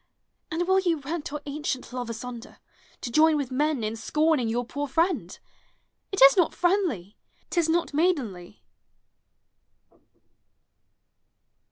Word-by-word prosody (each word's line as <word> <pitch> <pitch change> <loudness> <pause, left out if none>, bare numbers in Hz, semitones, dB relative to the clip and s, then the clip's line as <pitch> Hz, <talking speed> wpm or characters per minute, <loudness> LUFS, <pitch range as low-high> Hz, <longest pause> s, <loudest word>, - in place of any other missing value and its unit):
And 345 +1 -2
will 380 0 +4
you 350 -4 +1
rent 295 +2 -5
our 295 0 -5
ancient 285 -3 -4
love 245 -2 -4
asunder, 235 +1 -7 0.4
To 240 - -5
join 310 +4 +5
with 275 -3 -3
men 290 -1 0
in 215 +1 -2
scorning 300 0 +1
your 240 +2 -1
poor 285 +4 -4
friend? 335 +6 0 0.7
It 390 - +4
is 275 0 +9
not 350 -3 +2
friendly, 345 - 0 0.3
t 350 - +1
is 330 -1 +1
not 335 -1 0
maidenly. 250 - -1
295 Hz, 130 wpm, -26 LUFS, 245-330 Hz, 0.7 s, is